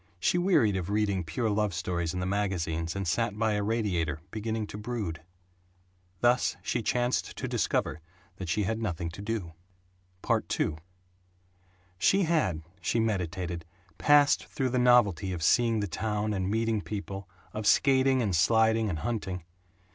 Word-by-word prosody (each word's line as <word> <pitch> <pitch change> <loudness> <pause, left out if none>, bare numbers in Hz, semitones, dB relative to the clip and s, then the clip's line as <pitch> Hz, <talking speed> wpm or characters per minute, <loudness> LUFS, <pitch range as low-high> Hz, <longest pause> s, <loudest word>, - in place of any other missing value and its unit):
She 175 - +2
wearied 160 - +3
of 90 0 -4
reading 100 -3 +1
pure 85 +9 -2
love 105 -3 0
stories 85 -1 -2
in 90 - -4
the - - -2
magazines 90 -4 -1
and 100 -2 -3
sat 110 +5 0
by 110 0 +1
a 105 - 0
radiator, 95 -9 -1
beginning 110 0 -2
to 105 - -8
brood. 105 -8 -4 1.0
Thus 120 +1 +3
she 120 - -1
chanced 120 +3 0
to - - -3
discover 80 - -1 0.4
that 95 -3 -6
she 105 +6 +1
had 110 +4 -2
nothing 85 -5 -2
to 90 - -9
do. 105 -6 -3 0.7
II 75 - 0 1.2
She 195 - +4
had, 105 - +1 0.2
she 100 +7 0
meditated, 90 -5 -2 0.4
passed 145 -1 +4
through 130 -1 -1
the 125 +1 0
novelty 105 -8 +4
of 85 -3 -4
seeing 115 +4 +3
the 105 - -1
town 105 +4 -2
and 95 -1 -1
meeting 110 0 0
people, 100 -2 -6 0.2
of 105 -1 -3
skating 130 -1 +4
and 100 -5 0
sliding 110 +5 +3
and 85 - -2
hunting. 95 -7 -3
105 Hz, 155 wpm, -29 LUFS, 90-115 Hz, 1.2 s, She